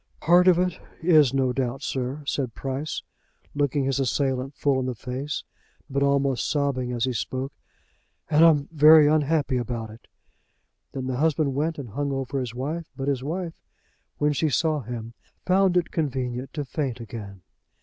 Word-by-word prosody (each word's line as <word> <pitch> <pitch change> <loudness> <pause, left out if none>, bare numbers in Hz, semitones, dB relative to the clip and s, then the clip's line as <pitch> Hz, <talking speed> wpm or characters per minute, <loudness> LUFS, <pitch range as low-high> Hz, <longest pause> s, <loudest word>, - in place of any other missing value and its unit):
"Part 175 +2 +5
of 180 -2 +6
it 180 -1 0 0.2
is 155 -6 +5
no 135 -2 +1
doubt, 130 +1 -2
sir," 130 +3 -3
said 130 -4 -2
Price, 135 +3 -4 0.5
looking 145 -1 +1
his 135 +1 0
assailant 135 +1 -1
full 140 -2 +1
in 130 - -2
the 125 - -3
face, 130 +5 -4 0.5
but 140 +1 0
almost 140 -2 +1
sobbing 140 -4 0
as 120 -2 -2
he 130 - -1
spoke, 130 +5 -3 0.7
"and 155 +1 +4
I'm 150 -4 +5
very 155 0 +8
unhappy 150 -3 +2
about 115 -2 -4
it." 110 - -15 0.8
Then 130 -1 -5
the 130 -1 -2
husband 155 -1 +1
went 155 +4 -1
and 135 -5 -7
hung 140 +6 -2
over 135 0 -2
his 120 -2 -4
wife, 155 +6 -4
but 135 0 -3
his 130 -2 -1
wife, 165 +3 -3 0.6
when 150 0 +2
she 150 +3 +1
saw 155 +3 +1
him, 115 -1 -7 0.3
found 185 -1 +3
it 175 - 0
convenient 130 -4 -2
to 150 -2 -3
faint 130 -3 -3
again. 105 -5 -8
135 Hz, 170 wpm, -25 LUFS, 125-150 Hz, 0.8 s, very